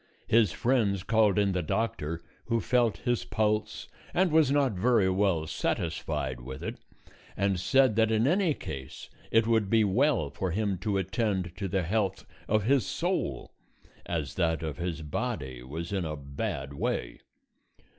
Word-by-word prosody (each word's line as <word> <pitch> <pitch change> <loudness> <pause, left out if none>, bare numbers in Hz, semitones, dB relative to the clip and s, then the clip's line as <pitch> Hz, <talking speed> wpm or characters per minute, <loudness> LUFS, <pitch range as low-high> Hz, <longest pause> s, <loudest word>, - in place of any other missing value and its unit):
His 110 -5 +4
friends 105 -6 +1
called 110 -1 +3
in 100 -1 +3
the 90 -1 0
doctor, 85 -4 -2 0.2
who 115 -1 +1
felt 120 +2 +2
his 120 -1 +1
pulse 110 0 -1 0.3
and 180 -1 +3
was 155 -3 +5
not 140 -2 +3
very 105 0 +3
well 95 -4 +1
satisfied 65 -4 -2
with 65 +1 -8
it, - - -4 0.6
and 100 -1 +1
said 120 +5 +3
that 110 -1 +4
in 110 +1 +2
any 175 0 +2
case 70 -4 -8 0.2
it 115 0 +4
would 110 -3 +2
be 110 0 +4
well 105 - +2
for 95 +6 -3
him 100 0 -1
to 100 0 -1
attend 95 -3 -1
to 100 -1 -2
the 95 0 0
health 95 +1 -1 0.2
of 110 0 +2
his 130 +2 +3
soul, - - -2 0.6
as 80 -4 -2
that 80 -3 0
of 80 -2 -4
his 85 -2 -3
body 75 - -3
was 80 +9 -6
in 95 -2 0
a 80 -2 -3
bad 70 -1 -4
way. - - -2
100 Hz, 160 wpm, -29 LUFS, 85-115 Hz, 0.6 s, was